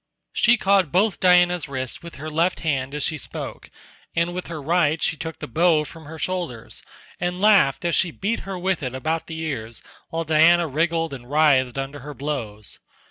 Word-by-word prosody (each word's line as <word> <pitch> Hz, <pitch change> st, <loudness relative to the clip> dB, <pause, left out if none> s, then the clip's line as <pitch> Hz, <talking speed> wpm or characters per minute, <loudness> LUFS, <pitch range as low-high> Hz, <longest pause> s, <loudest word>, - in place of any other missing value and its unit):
She 240 Hz, +1 st, +4 dB
caught 195 Hz, -6 st, +3 dB
both 195 Hz, +2 st, +2 dB
Diana's 180 Hz, -2 st, +4 dB
wrists 130 Hz, -2 st, -4 dB
with 170 Hz, 0 st, -10 dB
her 155 Hz, +3 st, -7 dB
left 170 Hz, +4 st, +1 dB
hand 140 Hz, -3 st, -1 dB
as 150 Hz, -, -2 dB
she 155 Hz, 0 st, 0 dB
spoke, -, -, -8 dB, 0.5 s
and 170 Hz, +1 st, +1 dB
with 180 Hz, 0 st, -5 dB
her 165 Hz, -2 st, -6 dB
right 160 Hz, +1 st, +2 dB
she 160 Hz, -, 0 dB
took 160 Hz, 0 st, -6 dB
the -, -, -6 dB
bow 160 Hz, +4 st, +3 dB
from 160 Hz, +1 st, -11 dB
her 160 Hz, +2 st, -9 dB
shoulders, 170 Hz, -10 st, -4 dB, 0.4 s
and 180 Hz, +1 st, -2 dB
laughed 190 Hz, -9 st, +4 dB
as 170 Hz, -, +1 dB
she 180 Hz, -, +2 dB
beat 200 Hz, +7 st, -2 dB
her 195 Hz, -1 st, -6 dB
with 185 Hz, -1 st, -1 dB
it 130 Hz, -2 st, -4 dB
about 160 Hz, +5 st, -2 dB
the 160 Hz, -, -6 dB
ears 120 Hz, -9 st, -5 dB, 0.3 s
while 165 Hz, -1 st, -2 dB
Diana 165 Hz, +2 st, +5 dB
wriggled 165 Hz, +1 st, 0 dB
and 125 Hz, -2 st, -9 dB
writhed 140 Hz, -4 st, +3 dB
under 135 Hz, +2 st, -4 dB
her 145 Hz, +2 st, -9 dB
blows. 120 Hz, -7 st, -5 dB
160 Hz, 190 wpm, -23 LUFS, 140-175 Hz, 0.5 s, Diana